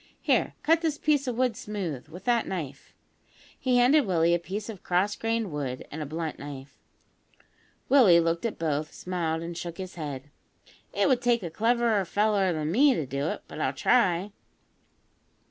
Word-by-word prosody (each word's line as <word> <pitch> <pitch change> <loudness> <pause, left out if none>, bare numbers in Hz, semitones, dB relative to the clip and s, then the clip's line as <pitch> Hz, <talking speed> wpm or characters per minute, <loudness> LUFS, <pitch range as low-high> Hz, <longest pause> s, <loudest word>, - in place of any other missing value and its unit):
Here, - - +1
cut 325 +1 +3
this 315 -3 -1
piece 290 -2 +1
of 245 -2 -2
wood 250 -3 +1
smooth, 190 - -5
with 170 +4 -11
that 240 -2 +1
knife." 150 -7 -6 0.6
He 255 -1 +2
handed 260 +2 +4
Willie 170 -2 +3
a 175 - +2
piece 200 +5 -5
of 215 -5 -8
cross 185 +3 +1
grained 225 -3 -1
wood 135 -4 -4
and 155 - -5
a 150 - -4
blunt 160 +1 -4
knife. 140 -1 -9 1.1
Willie 225 -11 +6
looked 165 0 0
at 230 - -2
both, 155 -1 -2
smiled, 165 -3 -2
and 170 0 -6
shook 170 0 -6
his 185 -1 -6
head. 145 -4 -6 0.6
"It - - +1
would 260 -3 +2
take 240 -3 +2
a 170 - -5
cleverer 230 +1 +2
feller 205 0 +2
than 155 -1 -2
me 270 +6 +5
to 155 - -2
do 140 +3 -2
it; - - -4
but - - -7
I'll 130 - 0
try." 190 - +2
180 Hz, 180 wpm, -27 LUFS, 160-230 Hz, 1.1 s, Willie